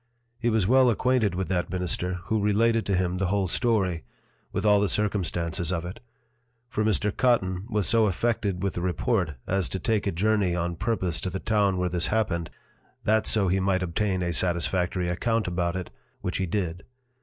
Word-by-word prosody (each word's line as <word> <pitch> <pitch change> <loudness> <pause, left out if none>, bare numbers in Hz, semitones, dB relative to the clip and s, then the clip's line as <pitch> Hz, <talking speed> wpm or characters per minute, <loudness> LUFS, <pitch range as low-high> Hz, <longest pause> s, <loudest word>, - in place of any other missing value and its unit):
He 120 0 +1
was 110 -4 +2
well 130 +3 +5
acquainted 120 -4 +1
with 95 0 -2
that 90 -2 -1
Minister, 90 0 -1
who 110 +3 0
related 115 +2 +2
to 100 - +1
him 90 0 0
the 95 - +1
whole 100 0 +1
Story, 95 -5 +1 0.5
with - - -2
all 105 -1 +5
the 100 - +2
Circumstances 85 -5 -1
of 85 -2 -2
it: 95 +6 -7 0.7
For 110 -2 -1
Mr. 105 -1 0
Cotten 95 -6 +1
was 105 -4 0
so 115 -2 +4
affected 100 -2 -1
with 100 - 0
the 85 - -4
Report, 90 -1 0
as 95 -1 0
to - - -3
take 105 +2 0
a - - +1
Journey 100 0 +1
on 85 0 -2
purpose 95 -4 -1
to 95 - -2
the 95 +1 -4
Town 100 -3 +1
where 90 0 0
this 90 0 0
happened, 95 -7 -1 0.5
that 110 0 +2
so 105 -3 +3
he 95 +2 +2
might 95 -1 +1
obtain 90 +1 -1
a 85 0 -1
satisfactory 90 +2 0
account 115 +6 0
about 85 0 -1
it, 95 -1 -5 0.3
which - - -2
he 95 - -1
did. 90 -2 -2
95 Hz, 190 wpm, -26 LUFS, 90-110 Hz, 0.7 s, well